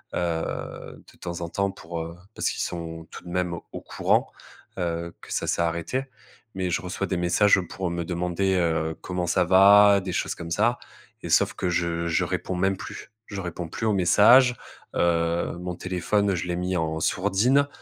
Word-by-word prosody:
heu, 85 -2 -4
de - - -23
temps 85 -1 -5
en 85 - -4
temps 100 +2 0
pour 85 -3 -7
heu, 85 +1 -7 0.2
parce - - -1
qu'ils - - -3
sont 80 -1 -6
tout - - -10
de 90 - -10
même 90 -1 -1 0.2
au - - -7
courant. - - 0 0.5
Heu, 85 -1 -2
que - - -7
ça - - -1
s'est - - +1
arrêté. 85 +11 -2 0.5
Mais 95 -1 -2
je 85 - 0
reçois 90 +2 -3
des 90 - -1
messages 90 +3 +4
pour 95 +1 -3
me 85 0 -3
demander, 90 +2 -1
heu, 80 -2 0
comment 90 -1 -3
ça 90 +2 +3
va, 100 +2 +7
des 95 -1 -4
choses - - -1
comme 85 0 -8
ça 120 +8 +2 0.5
et - - -5
sauf - - +3
que - - -2
je 85 -1 -1
je 80 - +1
réponds 95 - -3
même 95 +1 +1
plus. - - -9
Je 100 -2 -6
réponds 85 -1 -5
plus 110 - -4
aux 105 - +2
messages, 120 +7 +6 0.4
heu, 85 0 +1
mon 90 0 -4
téléphone, 95 +3 0
je 85 - -3
l'ai 90 - -1
mis 90 0 -1
en 80 0 -1
sourdine. 105 - +2
90 Hz, 190 wpm, -25 LUFS, 85-95 Hz, 0.5 s, va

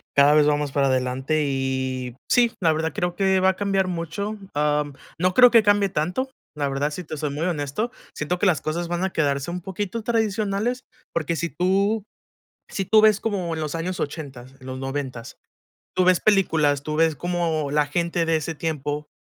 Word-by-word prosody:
cada 145 +1 +6
vez 150 -1 +5
vamos 145 -1 +1
para 140 0 +2
adelante 130 +4 0
y 130 -2 -2
sí, 240 -2 +4
la 165 -3 +4
verdad 160 0 -2
creo 175 +2 -2
que 190 -1 +2
va 190 0 +4
a 190 - +1
cambiar 195 -1 0
mucho. 180 +5 -3 0.2
Am, 150 0 0 0.2
no 180 +2 +1
creo 250 +3 +8
que 230 -2 +6
cambie 205 -1 +3
tanto, 180 - -1 0.3
la 145 -2 -1
verdad, 140 +2 -1
si 180 +4 -5
te 155 -1 -7
soy 150 -1 -2
muy 150 +4 -2
honesto, 160 - -2 0.2
siento 165 +4 -2
que 205 - 0
las 180 -6 +3
cosas 170 +3 -2
van 175 +1 -2
a 190 - +1
quedarse 140 -3 0
un 180 +1 -4
poquito 200 +4 -4
tradicionales, 220 +1 0 0.3
porque 170 0 -1
si 170 +1 -2
tú 195 +5 +1 0.7
si 195 - -2
tú 215 +3 +5
ves 215 -1 +5
como 190 -6 -2
en 160 - -4
los 150 -1 -3
años 175 +3 -3
ochentas, 135 -4 -6
los 130 0 -7
noventas, 135 -3 -5 0.6
tú 185 - +4
ves 185 -1 +4
películas, 160 -9 +2
tú 150 +1 -3
ves 160 -1 +3
cómo 165 -3 -1
la 150 0 +2
gente 170 +2 -1
de 165 0 +2
ese 160 +1 -3
tiempo 150 -2 -3
165 Hz, 195 wpm, -23 LUFS, 145-190 Hz, 0.7 s, creo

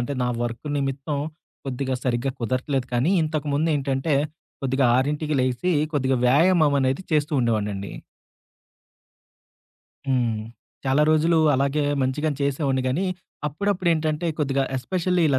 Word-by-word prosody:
అంటే 130 +4 -2
నా 125 - +1
వర్క్ 120 +4 -4
నిమిత్తం 140 +2 -2 0.5
కొద్దిగా 130 0 -2
సరిగ్గా 125 +1 0
కుదరట్లేదు 130 +3 -1
కానీ 125 +9 +2
ఇంతకుముందేంటంటే 145 -2 0 0.5
కొద్దిగా 135 0 +1
6కి 150 +3 0
లెగిసి 130 +8 0 0.2
కొద్దిగా 130 -2 +1
వ్యాయామమనేది 145 -1 +3
చేస్తూ 150 0 +1
ఉండేవాడినండి. 105 -4 -1 2.2
హ్మ్. 120 -4 +1 0.4
చాలా 135 +2 +3
రోజులు 160 +2 +3 0.2
అలాగే 140 +2 +1 0.2
మంచిగానె 145 +3 -1
చేసేవాడిని 135 -1 0
గానీ 165 +10 0 0.4
అప్పుడప్పుడేంటంటే 165 -1 0
కొద్దిగా 135 -2 +1
ఎస్పెషల్‌ల్లి 180 +6 0
ఇలా 135 -2 +3
140 Hz, 105 wpm, -24 LUFS, 130-155 Hz, 2.2 s, వ్యాయామమనేది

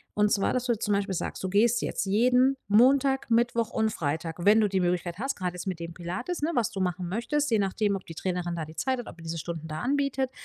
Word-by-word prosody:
Und 210 0 +3
zwar, 195 - +2
dass 250 -1 -1
du 240 -2 +2
zum 205 -2 +1
Beispiel 200 -1 -1
sagst, - - -4
du 190 - -1
gehst 225 +5 +3
jetzt - - -2
jeden 250 +6 +4
Montag, 265 +6 +4
Mittwoch 230 -1 +2
und 220 0 +1
Freitag, 160 +2 -3
wenn 210 +2 +6
du 210 - +3
die 190 -1 0
Möglichkeit 175 0 -1
hast, 270 +3 -2
grade 180 -2 -2
jetzt 180 +2 -7
mit 185 -3 -3
dem 170 0 -6
Pilates, 180 - -4
ne, 305 - +1
was 235 -3 +1
du 200 - -5
machen 180 -1 -1
möchtest, 265 +8 -1
je 220 - +3
nachdem, 200 +1 0
ob 190 - -7
die 165 - -8
Trainerin 175 -1 -2
da 160 -2 -3
die 155 +1 -13
Zeit 260 +10 0
hat, 240 - -7
ob - - -10
die 165 - -13
diese 165 0 -4
Stunden 160 -1 -5
da 155 0 -5
anbietet. 275 -1 0
200 Hz, 260 wpm, -27 LUFS, 175-245 Hz, -, wenn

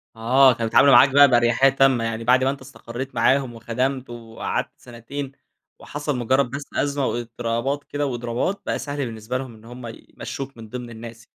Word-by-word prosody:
آه 125 +3 +5
كانوا 115 0 -3
بيتعاملوا 140 +4 +5
معاك 130 +2 +8
بقى 145 +1 +7
بأريحية 120 +2 +4
تامّة، 135 -3 +3
يعني 115 0 -3
بعد 125 +2 +4
ما 130 - +2
أنت 135 0 -4
استقريت 130 0 -8
معاهم 130 -2 +2
وخدمت 125 +3 -2
وقعدت 115 -1 -4
سنتين، 130 +3 -8 0.5
وحصَل 145 -2 -4
مجرّد 130 +2 +1
بس 140 +1 -5
أزمة 140 -1 0
وإضطرابات 120 +4 -2
كده 145 0 -3
وإضرابات، 120 +8 -2
بقى - - -2
سهل 145 0 -4
بالنسبة 115 +1 -4
لهم 130 -3 -7
إن 110 0 -18
هُم 120 +1 -9 0.3
يمشّوك 135 -2 -6
من 110 -1 -11
ضمن 125 +1 -7
الناس. 115 0 -11
125 Hz, 175 wpm, -22 LUFS, 115-135 Hz, 0.5 s, معاك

